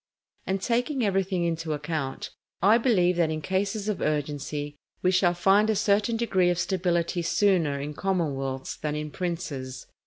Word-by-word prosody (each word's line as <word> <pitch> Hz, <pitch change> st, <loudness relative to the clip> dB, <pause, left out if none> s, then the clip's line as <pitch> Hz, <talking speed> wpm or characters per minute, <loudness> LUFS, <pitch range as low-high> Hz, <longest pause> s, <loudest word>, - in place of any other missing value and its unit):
And 190 Hz, +1 st, 0 dB
taking 245 Hz, +1 st, 0 dB
everything 190 Hz, -2 st, 0 dB
into 165 Hz, -2 st, -1 dB
account, 150 Hz, -2 st, -4 dB, 0.3 s
I 210 Hz, +6 st, +5 dB
believe 180 Hz, -8 st, +3 dB
that 170 Hz, -2 st, +2 dB
in 155 Hz, 0 st, -2 dB
cases 200 Hz, +5 st, -1 dB
of 210 Hz, -3 st, -2 dB
urgency, 145 Hz, 0 st, -2 dB, 0.3 s
we 185 Hz, -, +4 dB
shall 180 Hz, -1 st, +3 dB
find 200 Hz, +4 st, +4 dB
a 220 Hz, -, +2 dB
certain 210 Hz, +2 st, +2 dB
degree 190 Hz, -6 st, +2 dB
of 175 Hz, -, +1 dB
stability 175 Hz, -2 st, 0 dB
sooner 170 Hz, -5 st, +2 dB
in 145 Hz, +2 st, -4 dB
commonwealths 140 Hz, -8 st, -2 dB
than 150 Hz, -1 st, -3 dB
in 150 Hz, 0 st, -4 dB
princes. 145 Hz, -8 st, -4 dB
175 Hz, 155 wpm, -26 LUFS, 150-195 Hz, 0.3 s, I